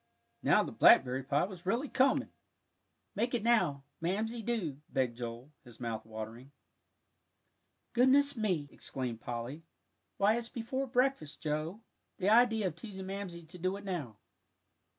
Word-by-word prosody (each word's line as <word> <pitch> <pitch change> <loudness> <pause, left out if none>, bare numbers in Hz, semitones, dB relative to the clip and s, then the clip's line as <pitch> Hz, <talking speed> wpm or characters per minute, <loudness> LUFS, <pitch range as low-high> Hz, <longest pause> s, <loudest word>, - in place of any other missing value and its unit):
Now - - +4
the - - -5
blackberry 130 +1 +6
pie 140 +3 +1
was 185 -1 -6
really 240 +9 +1
coming! 270 +1 +2 0.8
"Make 235 +4 0
it 230 - -1
now. 215 -13 +3 0.2
Make 170 +2 +1
it - - -2
now, 215 - 0
Mamsie, 230 +1 -4
do," 180 - -2
begged 125 -3 0
Joel, 120 +3 -6
his 120 -4 -15
mouth 115 -2 -4
watering. 110 +4 -8 1.4
"Goodness 275 +3 +5
me!" 185 -10 0
exclaimed 125 -4 -5
Polly; 120 +6 -5 0.6
"why, 210 +3 +4
it's 235 0 -3
before 260 +3 -3
breakfast, 250 - 0
Joe. 155 +7 -3 0.4
The 195 0 +1
idea 225 -1 +5
of 175 -4 -1
teasing 190 +1 -7
Mamsie 190 -3 -5
to 180 +3 -10
do 185 +3 -1
it 200 - -10
now." 150 - -4
180 Hz, 150 wpm, -32 LUFS, 135-230 Hz, 1.4 s, blackberry